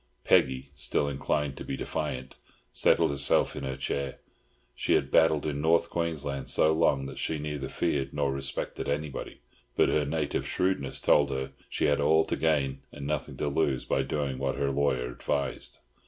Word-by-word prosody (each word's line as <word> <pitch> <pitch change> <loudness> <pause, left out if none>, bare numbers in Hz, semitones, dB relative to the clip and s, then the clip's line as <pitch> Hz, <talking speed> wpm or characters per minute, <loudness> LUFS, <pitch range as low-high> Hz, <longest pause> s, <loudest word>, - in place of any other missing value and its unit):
Peggy, 65 +1 +3
still 70 0 0
inclined 70 0 -1
to - - -6
be 70 - -4
defiant, 65 +1 -3 0.4
settled - - +3
herself 70 - +2
in - - -5
her 65 0 -3
chair. 70 0 -3 0.6
She - - +1
had - - 0
battled 80 -2 +4
in 75 -2 -2
North 85 +2 +3
Queensland 75 -5 -2
so 80 - +4
long 70 -4 +2
that 70 -1 -7
she 80 - -1
neither 75 -2 -4
feared 70 -1 -1
nor 70 -2 0
respected 70 +1 -4
anybody; 75 -1 -4 0.3
but - - +4
her 75 - +2
native 75 +2 -1
shrewdness 90 -7 0
told 70 -1 +4
her 65 0 -3 0.2
she - - 0
had 75 0 +3
all 80 +2 +4
to - - -1
gain 70 -4 +1
and 70 -1 -8
nothing 75 -1 -3
to - - -1
lose 70 -3 0
by 70 - +1
doing 70 -1 -2
what 70 -1 -1
her 70 -1 0
lawyer 65 -3 0
advised. 70 +3 -2
70 Hz, 175 wpm, -28 LUFS, 70-75 Hz, 0.6 s, battled